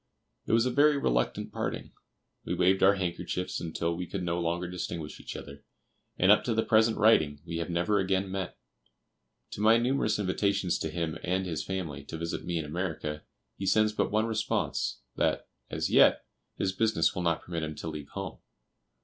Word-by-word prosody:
It - - 0
was 115 +1 +4
a 125 - +1
very 145 +2 +4
reluctant - - 0
parting. - - -3 0.5
We - - -2
waved 95 +1 +3
our 100 +1 +6
handkerchiefs 90 -1 -3
until 85 0 -2
we 90 +1 -4
could 95 0 -4
no 85 0 -1
longer 85 +1 -1
distinguish 85 -3 -5
each - - -8
other; 70 0 -9 0.5
and 95 +2 +5
up 105 - +5
to 115 - 0
the 110 - +2
present 110 0 +4
writing 80 -10 +4
we 85 -1 -4
have 85 +1 -3
never 90 +4 +1
again 95 0 0
met. 95 -1 -4 0.9
To - - -5
my 110 +2 +6
numerous 120 -2 +1
invitations 100 -2 0
to 80 - -2
him 80 0 -3
and 95 +2 0
his 80 -4 -3
family, 90 -7 -4
to 80 - -6
visit 85 +1 -4
me 85 -1 -1
in 80 - -2
America, 75 -2 -3 0.4
he 95 - -2
sends 110 +2 +3
but - - 0
one 110 +1 +2
response, 110 -1 -1 0.2
that, - - +1 0.2
as - - -2
yet, - - +5 0.3
his 95 - 0
business 100 -4 +2
will 90 - -3
not 85 -2 0
permit 85 -2 -4
him 75 -1 -4
to 80 - -6
leave 75 -3 -6
home. - - -6
90 Hz, 190 wpm, -29 LUFS, 85-105 Hz, 0.9 s, our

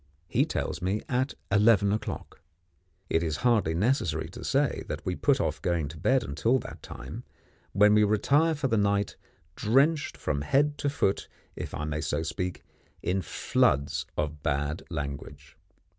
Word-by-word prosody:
He 85 - +2
tells - - -3
me 95 +4 -1
at 130 +2 0 0.2
eleven 105 -1 +5
o'clock. 110 - -5 0.7
It 80 - +1
is 80 -3 -1
hardly 110 -10 +3
necessary 90 - 0
to - - -9
say - - +1
that - - -5
we - - -1
put - - +2
off 75 - -1
going 85 -6 0
to 80 - -9
bed 130 +9 +3
until 115 - +1
that 125 - -8
time, - - -8 0.5
when 105 +1 +6
we 105 0 +5
retire 140 +10 +3
for 145 -2 -1
the 115 -3 +1
night, 100 -1 +1 0.4
drenched 140 +7 +2
from 70 - -2
head 145 - +2
to 145 - 0
foot, 100 -8 0 0.3
if - - -5
I 75 - -3
may 75 0 -2
so 80 0 -1
speak, 90 +2 -3 0.4
in 95 +2 0
floods 70 -3 +1
of 75 -1 -2
bad 75 +3 -1
language. 70 -2 -6
95 Hz, 160 wpm, -28 LUFS, 75-120 Hz, 0.7 s, when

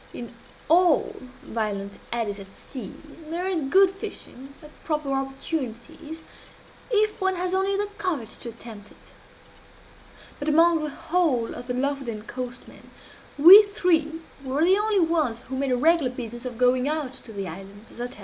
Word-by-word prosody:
In 240 0 -8 0.3
all 345 0 +3 0.3
violent 205 -3 -4
eddies 215 -4 -2
at 195 0 -11
sea 250 0 -9 0.4
there 350 +3 -2
is 365 -4 0
good 375 +7 +5
fishing, 280 - -9
at 300 - -13
proper 300 -3 -2
opportunities, 270 +2 -5 0.7
if 425 -2 +1
one 380 0 +1
has 365 +1 -2
only 385 +1 +1
the 410 - 0
courage 300 - -3
to 235 - -8
attempt 225 -3 -11
it; - - -20 1.3
but 290 - -2
among 330 +1 +4
the 305 - -2
whole 295 -6 0
of 245 - -9
the 250 - -2
Lofoden 260 -5 -2
coastmen 250 +2 -8 0.5
we 355 +8 +11
three 335 -6 0 0.2
were 270 +3 0
the 370 +2 +5
only 420 0 +1
ones 315 -9 +1
who 265 - -7
made 270 0 -1
a 250 - +2
regular 320 0 +3
business 240 0 -7
of 245 -2 -7
going 250 +2 +3
out 300 -4 -2
to 250 - -11
the 200 -3 -5
islands, 195 +5 -10
as - - -9
I 245 - -2
tell 250 - -11
you. - - -15
275 Hz, 170 wpm, -25 LUFS, 240-340 Hz, 1.3 s, we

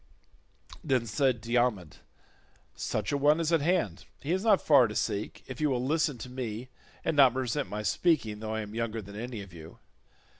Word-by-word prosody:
Then 130 -7 +1
said 120 +2 +1
Diomed, 115 -7 0 0.8
"Such 105 -2 -3
an 145 - 0
one 150 +3 +4
is 165 0 0
at 165 - +4
hand; 175 +4 0
he 145 - -4
is 190 +2 0
not 215 -4 +5
far 140 -6 +5
to 105 - -7
seek, 100 +1 -2
if 130 0 -8
you 150 - +3
will 125 -2 0
listen 150 -1 +1
to 120 - -7
me 125 -1 -5 0.4
and - - +1
not 135 -4 +6
resent 130 +2 -1
my 105 +1 -4
speaking 115 -7 +1
though 110 0 -4
I 110 - -1
am 105 0 -8
younger 115 -1 -3
than 100 +1 -11
any 115 -1 -5
of 95 -3 -14
you. 80 -1 -11
125 Hz, 195 wpm, -29 LUFS, 110-145 Hz, 0.8 s, not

